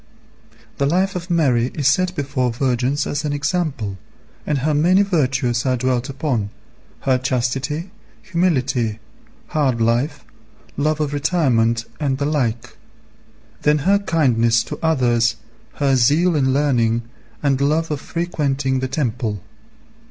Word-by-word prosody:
The 140 - +2
life 185 +5 +1
of 180 0 -5
Mary 130 -8 +2
is 145 -4 +1
set 185 +6 +2
before 135 -4 -1
virgins 130 +3 0
as 145 +1 -2
an 150 -1 -1
example, 145 - -2 0.5
and 150 - +1
her 150 +4 0
many 180 +7 +4
virtues 130 -9 0
are 130 -1 +1
dwelt 125 +1 -1
upon, 135 -7 -2 0.5
her 130 -1 +2
chastity, 135 +6 -2 0.3
humility, 135 - 0 0.5
hard 140 -7 +1
life, 120 +6 0 0.5
love 155 +2 0
of 145 -2 -1
retirement, 130 -8 +1
and 140 -3 0
the 140 - -1
like; 125 -7 -2 0.8
then 150 0 +3
her 200 +1 +4
kindness 120 - +2
to - - -7
others, 120 -7 +2 0.4
her 140 -2 +1
zeal 150 +8 +3
in 130 -3 +2
learning, 120 -5 +1 0.4
and 140 -2 +1
love 155 +3 +1
of 145 -2 -2
frequenting 140 -6 -1
the 130 - -2
temple. 120 - -2
140 Hz, 130 wpm, -20 LUFS, 125-155 Hz, 0.8 s, many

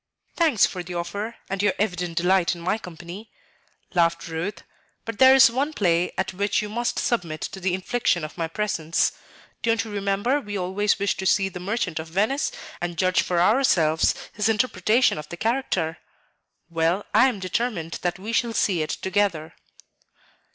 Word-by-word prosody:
"Thanks 310 - +4
for 185 - -4
the 175 0 -7
offer 200 +7 -4
and 195 0 -2
your 205 -1 +2
evident 180 -4 -2
delight 180 0 +2
in 170 - -10
my 185 +6 0
company," 180 +3 -10 0.6
laughed 170 -1 +1
Ruth; 165 +5 -4 0.4
"but 230 -2 -6
there 260 0 +8
is 260 -3 +7
one 280 +5 -1
play 175 - +1
at 190 0 -1
which 200 +2 0
you 210 0 -3
must 240 +3 -2
submit 170 -10 -1
to 195 - -5
the 185 -1 0
infliction 190 -3 0
of 155 - -6
my 165 -2 -2
presence. 165 -3 0 0.5
Don't 230 -1 +1
you 220 - -8
remember 205 +7 0
we 205 -4 -5
always 195 +3 0
wished 200 -1 -1
to 190 - -1
see 195 0 +3
the 180 - -8
'Merchant 195 -3 -2
of 160 - -6
Venice' 215 - 0 0.3
and 175 -1 -3
judge 185 +1 +3
for 175 -1 0
ourselves 175 - +3 0.2
his 210 +1 0
interpretation 220 -2 +2
of 150 - -9
the 175 - -7
character? 220 -8 -1 0.7
Well, 170 +4 0
I 225 +5 +6
am 240 -6 -2
determined 185 -3 -2
that 175 0 -1
we 210 +5 -6
shall 230 0 +1
see 185 -6 +1
it 155 - -2
together." 190 -5 -1
190 Hz, 175 wpm, -24 LUFS, 170-220 Hz, 0.7 s, there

